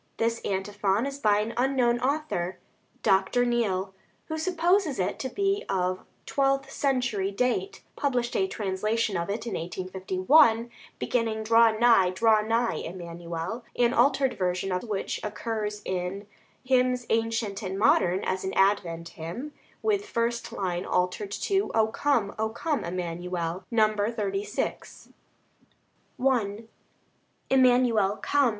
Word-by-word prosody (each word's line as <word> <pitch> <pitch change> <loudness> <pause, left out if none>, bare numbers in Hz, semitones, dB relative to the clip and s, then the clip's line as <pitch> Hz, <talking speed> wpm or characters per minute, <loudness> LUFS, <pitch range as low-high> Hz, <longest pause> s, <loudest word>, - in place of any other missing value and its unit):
This 230 0 0
antiphon 200 +2 -1
is 280 0 -5
by 210 -5 +3
an 225 +2 -3
unknown 245 -2 +2
author. 255 - -1 0.5
Dr. 195 +6 +3
Neale, 200 -6 0 0.4
who 315 - -2
supposes 345 -2 +1
it 185 - -1
to 260 - -3
be 395 +3 0
of 185 -1 -1 0.2
twelfth 275 0 0
century 250 -8 0
date, 255 - -1
published 245 -4 -1
a 190 - +2
translation 210 +2 -1
of 170 +2 -2
it 215 +3 -3
in 230 - -4
1851, 190 - +2 0.3
beginning, 225 -3 -1
"Draw 225 0 +5
nigh, 230 -6 +5
draw 215 +3 +3
nigh, 230 +2 0
Emmanuel," 170 +4 -6
an 240 0 +3
altered 270 -2 +3
version 185 -1 -1
of 180 0 0
which 210 -4 -3
occurs 210 -1 -3
in 185 +2 -3 0.4
"Hymns 250 -1 +2
Ancient 225 -2 0
and 190 +1 -4
Modern" 190 -3 +3
as 185 0 -2
an 190 - -3
Advent 175 -4 +1
hymn, 205 - -7 0.3
with 415 -2 +1
first 235 0 -1
line 180 -2 -2
altered 180 +3 -1
to, 390 - 0
"O 220 -1 +5
come, 230 -4 0
O 220 0 +1
come, 295 +6 -2
Emmanuel" 175 0 -4
(No. 215 -2 +3 0.2
36). 205 -2 -4 1.1
I 230 -5 +1 0.9
Emmanuel, 245 -6 +4
come! 285 -3 +2
220 Hz, 130 wpm, -27 LUFS, 190-250 Hz, 1.1 s, Draw